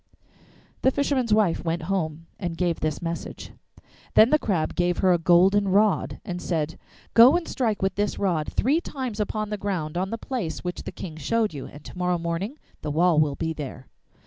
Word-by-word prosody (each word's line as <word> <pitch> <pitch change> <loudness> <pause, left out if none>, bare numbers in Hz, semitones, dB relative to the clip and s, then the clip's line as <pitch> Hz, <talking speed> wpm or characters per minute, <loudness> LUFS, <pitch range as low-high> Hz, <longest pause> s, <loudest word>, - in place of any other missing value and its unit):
The - - +5
fisherman's 265 -4 0
wife 210 -6 +3
went 165 -1 -2
home 165 -3 -2
and 175 -3 -3
gave 175 -2 0
this 155 +2 -2
message. 165 0 -5 0.6
Then 220 +3 +7
the 305 - +5
Crab 175 - -1
gave 175 0 +1
her 185 -1 +4
a 175 - +2
golden 185 +4 +4
rod, 205 +1 +2
and 180 -1 -4
said, 160 -2 -2 0.3
'Go 250 +8 +8
and 350 - -5
strike 225 -7 -1
with 190 - +1
this 205 +1 -1
rod 170 -6 0
three 290 +8 +2
times 255 -9 -5
upon 215 0 -2
the 210 - -1
ground 175 -6 -2
on 190 +1 -1
the 230 - -3
place 225 - -4
which 180 0 -4
the - - -5
King 160 -4 -8
showed 220 +5 0
you, 140 -3 -6
and 145 +1 -13
to - - -10
morrow 180 0 0
morning 170 - -3 0.2
the 150 - -4
wall 165 +1 +3
will 150 -2 +2
be 160 +1 -2
there. 135 -4 -8
180 Hz, 200 wpm, -25 LUFS, 165-215 Hz, 0.6 s, Go